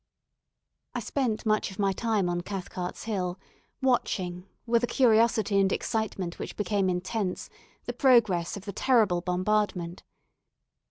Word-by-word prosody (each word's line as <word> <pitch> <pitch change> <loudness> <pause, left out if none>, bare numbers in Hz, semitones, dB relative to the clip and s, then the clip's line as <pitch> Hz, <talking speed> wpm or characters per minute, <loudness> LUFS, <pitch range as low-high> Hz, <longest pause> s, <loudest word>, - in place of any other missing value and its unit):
I - - 0
spent 245 -5 -1
much 215 -1 +1
of 190 - -11
my 200 -1 +2
time 210 -1 0
on 175 0 -1
Cathcart's 180 -1 -5
Hill, 185 -4 -2 0.4
watching, 185 -8 0 0.2
with 235 0 +2
a - - +2
curiosity 225 -4 +3
and 195 -1 +3
excitement 200 -6 -2
which - - -6
became 205 -2 +1
intense, 185 +2 -2 0.3
the - - -3
progress 215 - +3
of 195 - -10
the 200 - -5
terrible 215 -7 +3
bombardment. 180 -1 -1
200 Hz, 130 wpm, -28 LUFS, 180-225 Hz, 0.4 s, curiosity